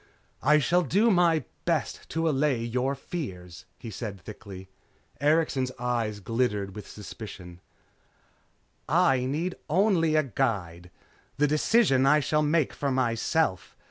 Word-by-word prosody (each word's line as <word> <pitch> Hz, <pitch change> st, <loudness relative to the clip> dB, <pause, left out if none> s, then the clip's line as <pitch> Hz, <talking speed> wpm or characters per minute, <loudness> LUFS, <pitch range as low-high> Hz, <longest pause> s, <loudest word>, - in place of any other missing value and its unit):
"I 150 Hz, +1 st, +5 dB
shall 170 Hz, +4 st, +2 dB
do 200 Hz, -, +3 dB
my 170 Hz, -5 st, +3 dB, 0.2 s
best -, -, -2 dB
to 165 Hz, +1 st, -1 dB
allay 135 Hz, -5 st, +1 dB
your 125 Hz, +4 st, -1 dB
fears," 95 Hz, -, -7 dB
he 115 Hz, -, -8 dB
said 105 Hz, -2 st, -6 dB
thickly. 95 Hz, -1 st, -10 dB, 0.5 s
Erikson's 145 Hz, -3 st, +1 dB
eyes 120 Hz, -4 st, -2 dB
glittered 105 Hz, -2 st, -1 dB
with 105 Hz, -, -8 dB
suspicion. 95 Hz, -4 st, -10 dB, 1.3 s
"I 155 Hz, -7 st, +3 dB
need 160 Hz, +7 st, -2 dB, 0.2 s
only 170 Hz, -3 st, +3 dB
a 155 Hz, -, +4 dB
guide. 95 Hz, -, -2 dB, 0.5 s
The 145 Hz, -, +3 dB
decisions 150 Hz, -, +3 dB
I 150 Hz, +2 st, +5 dB
shall 150 Hz, +1 st, +1 dB
make 150 Hz, -1 st, +1 dB
for 140 Hz, -, -2 dB
myself. 115 Hz, -, 0 dB
130 Hz, 125 wpm, -27 LUFS, 105-155 Hz, 1.3 s, I